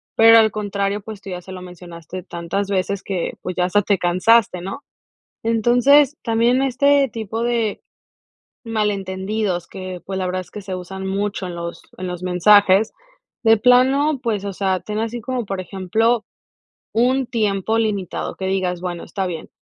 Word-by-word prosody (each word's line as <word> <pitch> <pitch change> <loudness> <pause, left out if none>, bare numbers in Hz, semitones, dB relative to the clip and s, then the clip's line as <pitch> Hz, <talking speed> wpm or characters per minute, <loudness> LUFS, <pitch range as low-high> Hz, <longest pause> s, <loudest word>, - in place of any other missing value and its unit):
pero 225 0 +8
al 220 -1 +4
contrario, 200 -1 -2
pues, 210 -1 -9
tú - - -9
ya 180 -1 -5
se 190 +1 -10
lo 185 - -8
mencionaste 180 0 -9
tantas 175 +4 -3
veces 195 0 -1
que, 185 -3 -3
pues, 180 - -5
ya 180 - +1
hasta 205 +3 +2
te 200 -1 +2
cansaste, 185 +3 +3
¿no?, 195 +10 -6 0.6
entonces, 245 +6 +4
también 235 +3 +2
este 275 +1 +3
tipo 225 0 -4
de 235 -3 -1 0.8
malentendidos 200 -3 -2
que, 185 -2 -7
pues, 190 0 -3
la 185 - -1
verdad 185 +1 -2
es - - -19
que 210 - -8
se 190 -1 -5
usan 190 +1 -6
mucho 200 0 -2
en 175 - -6
los 170 0 -6 0.2
en 185 - -4
los 180 0 -5
mensajes, 195 +3 +4 0.5
de 225 0 +6
plano, 265 +5 +4
pues, 210 -4 -1
o 200 - -3
sea, 190 -1 0
ten 210 0 -5
así 230 +2 -3
como, 250 0 -3
por 195 -1 -3
ejemplo, 215 +5 0 0.7
un 255 +4 +2
tiempo 220 -2 0
limitado 205 -5 -2
que 190 - -5
digas: 185 -2 -1
"Bueno, 175 -2 -4
está 195 -2 -3
bien, 165 -3 -6
200 Hz, 170 wpm, -20 LUFS, 185-225 Hz, 0.8 s, pero